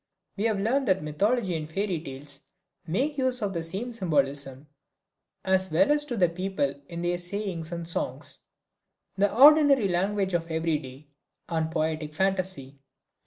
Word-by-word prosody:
We 210 - -2
have 220 -3 +1
learned 255 +7 +1
that 190 -4 +2
mythology 195 +6 0
and 155 -1 -5
fairy 190 -2 -1
tales 140 -1 -7 0.5
make 275 - -1
use 260 -1 +1
of 200 -1 -1
the 170 - -2
same 195 +9 -4
symbolism, 140 - -1 0.8
as 190 0 +2
well 165 - +3
as 295 0 +2
do 250 - -4
the 185 -5 +4
people 170 -5 -2 0.2
in 170 0 -5
their 175 0 0
sayings 180 -3 -3
and 170 -1 -5
songs, 165 - -2 0.8
the 200 +1 +2
ordinary 280 -2 +7
language 190 +2 0
of 170 -1 -1
every 160 -1 0
day, 135 +1 -11 0.4
and 160 -2 -1
poetic 155 -1 -2
phantasy. 185 -8 -1
180 Hz, 155 wpm, -27 LUFS, 160-205 Hz, 0.8 s, ordinary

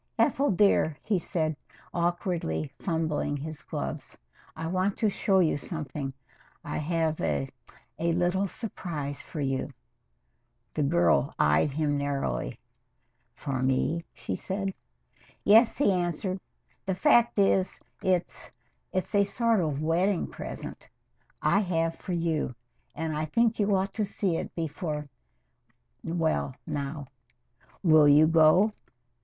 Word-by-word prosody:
"Ethel 285 +1 +3
dear," 180 -6 +3
he 205 -4 +1
said, 160 -2 -1 0.4
awkwardly 170 - -1
fumbling 160 -4 -1
his 150 +1 -7
gloves, - - -5 0.4
"I 160 - -5
want 185 +4 0
to 215 -2 +2
show 195 0 +2
you 160 -4 +2
something. 145 -3 -5 0.5
I - - -4
have 160 0 0
a 70 -2 0 0.5
a 170 +1 +1
little 180 +3 +1
surprise 155 - -5
for 155 - -6
you." 135 -1 -1 1.0
The 155 - -1
girl 150 -1 +3
eyed 75 - +3
him 145 0 0
narrowly. 135 - -2 0.8
"For 130 -2 -3
me?" 130 +6 +1
she 115 -5 -5
said. 195 - -3 0.7
"Yes," 225 +3 +6
he 275 -8 +4
answered. 180 +1 -1 0.5
"The 190 - 0
fact 235 +5 +4
is, 195 -1 +2 0.2
it's 180 -2 -1 0.4
it's 185 +3 -2
a 200 -1 +5
sort 225 +2 +1
of 155 -4 -1
wedding 175 +4 +2
present - - -8 0.5
I 200 - +4
have 165 -4 0
for 185 - -5
you, 165 -6 -1 0.4
and 160 0 -2
I 155 +1 -1
think 230 +8 +1
you 205 -1 +3
ought 195 +1 -1
to 215 - 0
see 190 -4 -1
it - - -5
before 155 -2 -3 1.0
well, 160 -5 0
now. 140 0 -4 0.8
Will 155 -4 +6
you 145 +2 +7
go?" 165 +6 +5
165 Hz, 125 wpm, -28 LUFS, 150-190 Hz, 1.0 s, you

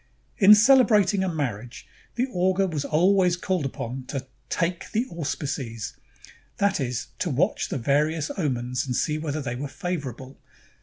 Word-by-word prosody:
In 210 0 +9
celebrating 215 -4 +5
a 190 - 0
marriage, 125 -7 -4 0.3
the 250 - +1
augur 185 +2 +2
was 155 -6 -2
always 180 +3 +3
called 180 -5 -1
upon 130 0 -6
to 135 -2 -4 0.2
"take 170 0 -2
the 225 +4 +1
auspices,''^ 135 -8 -4 0.6
that 200 -2 +1
is, 125 -3 -3
to 180 - -1
watch 170 +9 0
the - - -2
various 150 +5 +1
omens 125 -6 -1
and 125 -2 -3
see 155 +3 0
whether 155 -1 -3
they 120 -2 -3
were 140 +4 -4
favorable. 135 -5 -5
155 Hz, 150 wpm, -25 LUFS, 130-185 Hz, 0.6 s, In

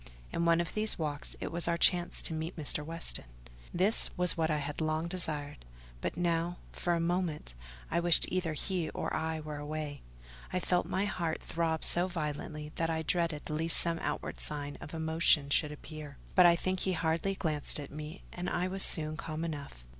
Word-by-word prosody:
In 170 - 0
one 170 0 +5
of 170 - -2
these 215 0 +1
walks, 150 -3 -3
it - - -4
was 170 +1 +2
our 170 0 +2
chance 175 0 +3
to - - +1
meet 160 +2 -3
Mr. 150 -1 +3
Weston. 165 +2 0 0.5
This 190 +5 +3
was 180 0 +3
what 160 -1 +1
I 155 - +2
had 145 +1 -4
long 155 +1 0
desired; 150 - -3 0.4
but - - -3
now, 170 0 0
for 175 -1 0
a - - 0
moment, 170 - -1 0.4
I 170 - +2
wished 170 -1 +6
either 180 -3 -1
he 175 +2 -2
or - - -2
I 160 0 -1
were 150 -1 -6
away: 145 -1 -4 0.5
I 185 - 0
felt 180 0 +1
my 190 +2 0
heart 170 -5 -2
throb 165 -1 -1
so 175 +2 +5
violently 150 -2 -4
that 165 0 +1
I 160 0 -1
dreaded 165 -2 0
lest 160 +2 +3
some 170 -1 +3
outward - - -3
signs 145 -1 -3
of 150 - -7
emotion 160 -3 +3
should 150 +1 +3
appear; 150 -1 -9 0.2
but 180 -1 +8
I 170 - +6
think 185 +2 -1
he 190 - 0
hardly 165 +4 0
glanced 155 -4 +1
at 145 - -7
me, 150 +4 -7
and 180 0 -3
I 180 - 0
was 190 +1 -3
soon 155 -3 +3
calm 160 0 -4
enough. 145 - -6
165 Hz, 195 wpm, -32 LUFS, 150-175 Hz, 0.5 s, but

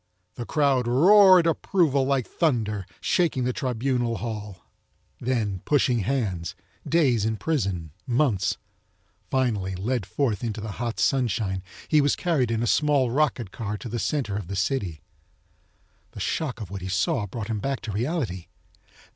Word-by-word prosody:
The 120 - -7
crowd 140 -5 +2
roared 185 +7 +7
approval 165 -4 +2
like 135 -3 +1
thunder 110 - -1
shaking 165 -8 +1
the 125 +1 0
tribunal 125 -2 -1
hall. 105 -5 -6 0.5
Then, 110 -7 -1
pushing 130 -4 +2
hands, 95 -7 -2 0.3
days 135 -10 +3
in 110 0 0
prison, 95 - -2 0.2
months. 120 -6 +1 0.7
Finally, 105 -8 0
led 105 +1 -2
forth 105 +2 -1
into 110 -2 -3
the 105 0 -5
hot 120 -1 -3
sunshine, 110 -7 +1 0.3
he 155 -1 +4
was 145 0 +2
carried 150 -9 +1
in 115 0 0
a - - +1
small 140 -1 +2
rocket 130 -7 0
car 105 -2 -4
to 120 - -8
the 120 +2 -3
center 130 -9 -1
of 100 -4 -4
the 100 - -4
city. 95 - -1 1.1
The - - -9
shock 140 -7 -2
of 100 -4 -7
what 100 -1 -5
he 95 - -5
saw 95 +2 0
brought 110 +2 -5
him 110 -2 -1
back 135 +5 -2
to 105 - -5
reality. 115 - -2
120 Hz, 155 wpm, -25 LUFS, 100-140 Hz, 1.1 s, roared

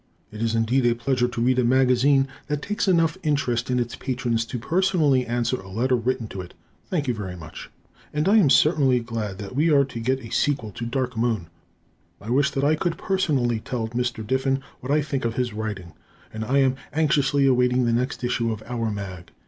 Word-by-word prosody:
It 105 +1 -8
is 115 0 0
indeed 115 +4 +2
a 120 - +3
pleasure 125 +1 0
to 120 -1 -4
read 130 +1 +3
a - - +3
magazine 130 +2 +3 0.2
that 150 -1 -2
takes 210 0 -2
enough 165 -1 +2
interest 135 -6 0
in 125 - +1
its 120 +1 -2
patrons 120 -3 -1
to 125 - -5
personally 155 -2 +2
answer 120 +2 0
a 95 - -12
letter 125 +6 +1
written 125 0 -1
to 95 - -6
it. 90 - -12 0.3
Thank 155 -6 -1
you 125 - +1
very 100 -5 -5
much. 80 -3 -10 0.4
And 150 +3 -1
I 210 +3 +5
am 180 -10 +5
certainly 135 -2 +4
glad 115 -4 -4
that 100 +2 -8
we 155 +4 +3
are 140 -2 +5
to 130 -3 -7
get 130 +3 0
a 115 - -10
sequel 135 -7 0
to 115 +4 -5
"Dark 125 0 -2
Moon." 110 -7 -1 0.7
I 110 +3 -6
wish 140 +2 +3
that 135 - -2
I 145 +2 +4
could 165 +2 -1
personally 140 -12 0
tell 115 0 -4
Mr. 120 -2 -2
Diffin 135 +3 0 0.2
what 130 - -5
I 150 0 +3
think 140 -2 -3
of 115 -1 -1
his 125 -3 -1
writing. 105 -6 -5 0.4
I 110 +5 -1
am 135 -1 +3 0.2
anxiously 145 -2 +2
awaiting 125 -1 +3
the 115 - +1
next 125 +2 -1
issue 120 -1 0
of 110 -1 -5
"our 115 -2 -2
mag." 95 -4 -6
125 Hz, 210 wpm, -24 LUFS, 115-140 Hz, 0.7 s, I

